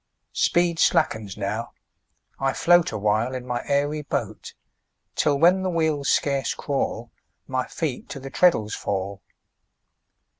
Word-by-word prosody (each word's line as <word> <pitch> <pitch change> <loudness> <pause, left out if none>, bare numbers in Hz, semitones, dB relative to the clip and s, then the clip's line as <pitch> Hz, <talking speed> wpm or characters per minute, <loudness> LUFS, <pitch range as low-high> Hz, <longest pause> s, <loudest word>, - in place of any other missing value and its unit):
Speed 170 -1 +2
slackens 110 - +1
now, 105 +3 -3 0.7
I 135 0 +1
float 175 +3 +4
Awhile 110 +4 0
in 125 -1 -5
my 125 -1 -2
airy 145 +2 0
boat; 145 - -4 0.6
Till, 145 -2 +2
when 175 +5 +5
the 185 - -1
wheels 160 -4 0
scarce 140 -2 +1
crawl, 120 -4 -3 0.3
My 130 -2 -2
feet 140 +1 -4
to 140 - -6
the 135 0 -9
treadles 110 -13 +3
fall. 100 0 -3
135 Hz, 125 wpm, -24 LUFS, 110-155 Hz, 0.7 s, when